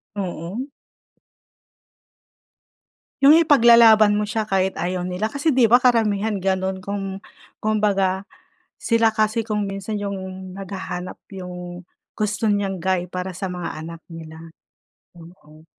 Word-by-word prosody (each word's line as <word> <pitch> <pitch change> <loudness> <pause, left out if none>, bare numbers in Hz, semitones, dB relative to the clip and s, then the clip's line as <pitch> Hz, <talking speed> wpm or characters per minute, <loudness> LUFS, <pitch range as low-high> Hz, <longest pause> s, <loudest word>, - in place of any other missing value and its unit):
Oo. 190 - -5 2.5
Yung 285 +3 +8
ipaglalaban 230 -8 +6
mo 210 - 0
siya, 215 0 -2
kahit 190 0 +1
ayaw 180 +1 -2
nila 185 +4 -2
kasi, 285 +4 0
'di 245 -3 +4
ba 240 - +8
karamihan 220 -4 +2
ganun 190 0 -1
kung, 195 0 -5 0.4
kumbaga, 200 -3 +1 0.5
sila 230 -1 +2
kasi 215 +1 0
kung 210 -2 -1
minsan 195 +2 -4
yung 200 -1 -3 0.4
naghahanap 190 -2 -6 0.2
yung 180 -1 -8 0.3
gusto 215 +1 -1
niyang 200 -2 -1
guy 185 -1 0
para 185 +1 -4
sa 190 +1 -4
mga 180 -3 -5
anak 165 0 -9
nila. 160 -1 -10 0.8
Oo. 165 -2 -16
195 Hz, 120 wpm, -22 LUFS, 185-220 Hz, 2.5 s, Yung